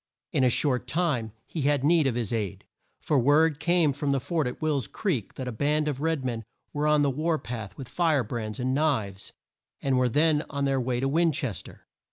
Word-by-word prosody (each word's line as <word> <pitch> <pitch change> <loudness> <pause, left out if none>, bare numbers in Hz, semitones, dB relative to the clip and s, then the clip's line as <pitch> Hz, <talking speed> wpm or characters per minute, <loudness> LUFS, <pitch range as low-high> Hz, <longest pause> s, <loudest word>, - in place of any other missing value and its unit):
In - - +2
a 125 - +5
short 125 -1 0
time 140 -8 0
he 160 - -5
had 140 -1 +2
need 160 -1 +4
of 125 - 0
his 120 -3 -2
aid, 105 -5 -3 0.4
for 145 - +2
word 150 +4 +3
came 170 -2 +3
from 145 +1 -2
the 140 -1 +2
fort 145 +2 -1
at 125 - -5
Will's 145 -8 0
Creek 155 - -2
that 130 - -5
a - - -2
band 150 +6 0
of 140 -2 -2
red 160 -4 0
men 115 -3 -2 0.3
were 150 +1 0
on 150 -1 +4
the 140 - +2
war 155 +4 0
path 115 -7 -7
with 135 - -7
fire 160 -5 +1
brands, 110 +1 -5
and 130 +1 0
knives, 120 -10 -1 0.5
and 135 -2 +1
were 125 -1 +2
then 150 +4 +3
on 140 -1 -1
their 135 -1 +1
way 120 0 -1
to 135 - +1
Win 165 +4 +3
ches 130 -7 -3
ter. - - -14
140 Hz, 225 wpm, -27 LUFS, 125-155 Hz, 0.5 s, a